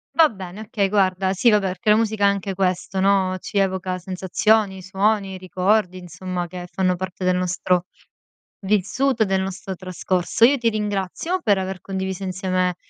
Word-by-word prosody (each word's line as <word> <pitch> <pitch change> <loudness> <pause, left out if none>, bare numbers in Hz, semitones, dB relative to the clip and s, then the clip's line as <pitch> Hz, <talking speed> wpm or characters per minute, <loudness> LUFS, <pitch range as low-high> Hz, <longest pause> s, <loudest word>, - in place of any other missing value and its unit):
Va 325 -1 +7
bene, 190 -5 -9
okay, 205 -2 -1
guarda 190 -2 +2
Sì, 195 +5 +3
vabbè, 210 -2 +3
perché 185 +3 -2
la 210 - +7
musica 220 -2 +1
è - - +7
anche 200 -1 -1
questo, 185 0 -1
no, 190 -1 +2
ci 205 - -5
evoca 190 -1 0
sensazioni, 190 +2 +1
suoni, 195 +1 0
ricordi, 185 +1 0
insomma, 180 +1 -5
che 180 +1 -8
fanno 185 -1 0
parte 185 0 -6
del 180 0 +2
nostro 180 0 0 0.8
vissuto, 215 +5 +1
e - - -4
del 190 0 +1
nostro 190 0 -5
trascorso. 185 +2 0
Io 280 +3 +3
ti 235 -3 +1
ringrazio 210 - -2
per 205 -3 +3
aver 190 -1 -4
condiviso 190 -1 -4
insieme 185 -1 -1
190 Hz, 170 wpm, -22 LUFS, 185-205 Hz, 0.8 s, Va